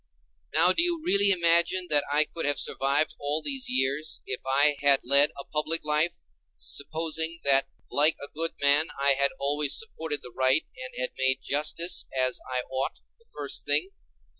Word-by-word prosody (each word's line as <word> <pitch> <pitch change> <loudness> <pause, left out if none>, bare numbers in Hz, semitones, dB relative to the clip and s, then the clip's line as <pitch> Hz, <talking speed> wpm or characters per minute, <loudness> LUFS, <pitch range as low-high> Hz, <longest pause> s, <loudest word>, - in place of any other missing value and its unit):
Now 180 - +4
do - - +1
you 345 -1 -1
really 200 - +5
imagine 170 0 +2
that 145 -1 +3
I 150 +1 +4
could 165 - -5
have 145 - +1
survived 140 +3 +1
all 145 +2 -2
these 265 -3 -2
years, 150 - -1
if 130 - -5
I 145 +2 +3
had 140 -1 +4
led 140 +3 +5
a - - -6
public 155 +3 -3
life, 150 +3 0 0.4
supposing 160 +2 -2
that 135 -1 +3 0.2
like 150 +2 +3
a 140 - -7
good 165 +2 -3
man 145 +2 +3
I 140 0 +3
had 140 0 +3
always 145 0 0
supported 160 -9 -3
the 125 - -12
right 130 +3 +2 0.2
and - - -9
had - - -2
made 130 0 +2
justice, 155 +4 +1
as 130 -1 -1
I 125 -1 -2
ought, 130 +1 -4 0.2
the 460 - -26
first - - -5
thing? 380 - +2
150 Hz, 175 wpm, -26 LUFS, 140-170 Hz, 0.4 s, really